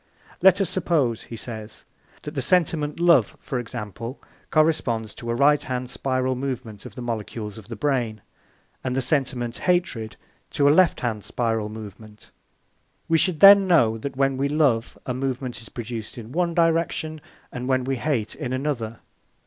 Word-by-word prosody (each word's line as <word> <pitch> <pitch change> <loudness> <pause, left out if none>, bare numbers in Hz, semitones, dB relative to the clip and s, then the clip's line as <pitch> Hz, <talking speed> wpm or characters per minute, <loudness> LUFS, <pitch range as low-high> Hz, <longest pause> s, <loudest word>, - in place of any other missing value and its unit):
"Let 190 0 +6
us 195 - +2
suppose," 155 - +1
he 115 - -8
says, 110 -1 -8 0.4
"that 150 - -6
the 140 - -1
sentiment 155 0 +1
love, 170 - +4
for 130 - -3
example, 115 +2 -6 0.3
corresponds 130 -9 +1
to 120 - -8
a 115 - 0
right 145 +3 +4
hand 125 -1 -4
spiral 130 -1 0
movement 125 -6 -5
of - - -14
the 125 - -6
molecules 110 -2 -5
of 105 - -14
the 115 - -6
brain 120 -5 -1 0.6
and 130 -1 -2
the - - +2
sentiment 125 -3 -1
hatred 175 -12 0 0.4
to 140 - +3
a - - +7
left 185 +1 +4
hand 110 -4 -2
spiral 115 -3 -1
movement. 110 0 -11 0.8
We 165 0 +3
should 175 -3 0
then 200 -1 +9
know 115 -11 +4
that 140 +5 -5
when 135 -1 +2
we 140 +1 0
love, 140 -7 +1
a 125 - -2
movement 130 -2 -3
is 115 - -11
produced 115 -2 -6
in 115 0 -9
one 170 +2 0
direction, 165 -2 +1 0.3
and 125 0 -5
when 130 -1 +2
we 135 +1 -1
hate, 115 -6 -1
in 125 - -4
another. 130 -5 -3
130 Hz, 170 wpm, -24 LUFS, 115-150 Hz, 0.8 s, then